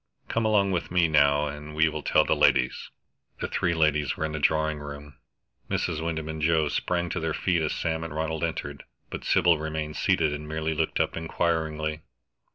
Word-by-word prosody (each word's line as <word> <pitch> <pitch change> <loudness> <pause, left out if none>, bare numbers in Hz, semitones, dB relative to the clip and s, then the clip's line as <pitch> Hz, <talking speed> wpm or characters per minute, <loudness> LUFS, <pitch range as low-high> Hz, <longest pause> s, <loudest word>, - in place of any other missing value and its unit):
Come 115 -1 0
along 100 -3 +3
with 90 -3 -2
me, 90 -2 +3
now, 70 -1 +4
and 75 +1 -7
we 80 +1 +4
will 75 -1 -3
tell - - +3
the - - +2
ladies." 60 - +2 0.5
The - - -2
three 85 -1 0
ladies 75 -3 +1
were 80 - -1
in 80 - -3
the 75 - -3
drawing 80 +1 +1
room. 75 -1 -9 0.5
Mrs. 80 -2 -1
Wyndham 80 -2 -3
and 80 0 -5
Joe 80 -1 +2
sprang 85 +3 -1
to - - -2
their 80 -1 -2
feet 90 -3 +1
as 75 - 0
Sam 80 -1 -2
and 80 - -6
Ronald 80 +1 -2
entered, 75 -4 -3 0.3
but - - -6
Sybil 85 -2 +3
remained 80 -1 -4
seated 75 - +2
and 75 +1 -6
merely 80 +1 -2
looked 75 - -1
up - - 0
inquiringly. 80 -2 -1
80 Hz, 195 wpm, -26 LUFS, 75-80 Hz, 0.5 s, now